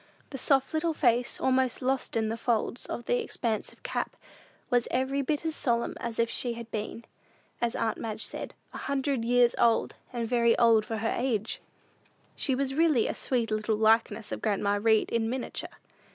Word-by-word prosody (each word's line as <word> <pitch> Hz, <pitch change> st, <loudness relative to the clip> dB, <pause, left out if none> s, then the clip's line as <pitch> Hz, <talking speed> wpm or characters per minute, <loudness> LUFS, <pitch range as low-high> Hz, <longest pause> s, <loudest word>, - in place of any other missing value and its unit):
The 270 Hz, 0 st, +3 dB
little 320 Hz, +1 st, +1 dB
soft -, -, -18 dB
face, 240 Hz, -2 st, +2 dB
almost 260 Hz, -1 st, +2 dB
lost 260 Hz, -2 st, -1 dB
in 220 Hz, -1 st, +1 dB
the 225 Hz, -, -1 dB
folds 235 Hz, +1 st, -1 dB
of 240 Hz, -, -5 dB
the -, -, +1 dB
expansive 230 Hz, -, -3 dB
cap, -, -, -3 dB, 0.6 s
was 245 Hz, -1 st, +3 dB
every 270 Hz, +2 st, 0 dB
bit 295 Hz, +3 st, -1 dB
as 320 Hz, -1 st, -1 dB
solemn 235 Hz, -2 st, +1 dB
as 235 Hz, -1 st, -4 dB
if 230 Hz, -, +3 dB
she 240 Hz, +1 st, 0 dB
had 230 Hz, -1 st, -9 dB
been, 220 Hz, +2 st, -4 dB, 0.6 s
as 235 Hz, -1 st, 0 dB
aunt 225 Hz, -1 st, -1 dB
Madge 220 Hz, -1 st, -3 dB
said, -, -, -6 dB, 0.2 s
"a -, -, -6 dB
hundred 275 Hz, -3 st, -1 dB
years 245 Hz, 0 st, +4 dB
old, 230 Hz, -1 st, +3 dB, 0.2 s
and 235 Hz, -2 st, -2 dB
very 235 Hz, -1 st, +3 dB
old 225 Hz, -2 st, +5 dB
for 225 Hz, -, -2 dB
her 225 Hz, +1 st, -1 dB
age." 235 Hz, -4 st, -1 dB, 0.7 s
She 265 Hz, -, +1 dB
was 270 Hz, 0 st, -1 dB
really 305 Hz, -6 st, +3 dB
a -, -, -1 dB
sweet 240 Hz, -4 st, -1 dB
little 215 Hz, 0 st, 0 dB
likeness 220 Hz, 0 st, +2 dB
of -, -, -4 dB
grandma 205 Hz, -1 st, +1 dB
Read 220 Hz, 0 st, +3 dB
in 225 Hz, -1 st, +1 dB
miniature. 255 Hz, +1 st, -4 dB
235 Hz, 180 wpm, -29 LUFS, 225-260 Hz, 0.7 s, old